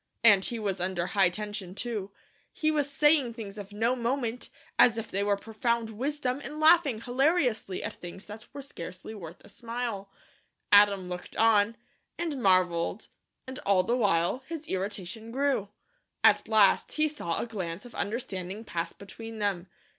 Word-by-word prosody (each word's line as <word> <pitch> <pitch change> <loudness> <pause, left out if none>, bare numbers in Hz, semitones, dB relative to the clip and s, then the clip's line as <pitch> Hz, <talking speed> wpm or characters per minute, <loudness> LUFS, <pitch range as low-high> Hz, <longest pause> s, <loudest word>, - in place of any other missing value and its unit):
And 205 -4 +7
he 235 - -2
was 195 -4 -2
under 180 -1 -1
high 190 0 +3
tension, 205 -1 -5
too. 210 -3 -3 0.4
He 310 0 0
was 290 -2 0
saying 285 -4 +3
things 210 -3 -7
of 200 0 -8
no 225 +4 +1
moment, 245 -1 -2 0.3
as 230 -2 +6
if 225 0 -5
they 195 - 0
were 200 0 +2
profound 225 +2 -1
wisdom, 265 +3 -2
and 300 - -6
laughing 310 -7 +5
hilariously 250 - +1
at - - -3
things 175 +3 -9
that 215 +2 -10
were 280 0 -7
scarcely 185 -4 -8
worth 175 -5 -10
a - - -14
smile. 230 -2 -4 0.6
Adam 205 -2 +6
looked 180 0 -7
on, 225 0 +4 0.4
and 315 -6 -3
marvelled 185 -1 +2 0.4
and 260 0 -7
all 195 -2 +3
the 235 +6 +1
while 195 -2 +2
his 320 -2 -6
irritation 200 +3 -4
grew. 265 -6 0 0.5
At - - +5
last 215 -3 +4
he 310 0 +2
saw 230 - -3
a - - -2
glance 190 -4 -5
of 245 - -12
understanding 200 -2 -4
pass 170 -6 -3
between 225 +3 -10
them. 195 -4 -1
215 Hz, 160 wpm, -29 LUFS, 195-245 Hz, 0.6 s, And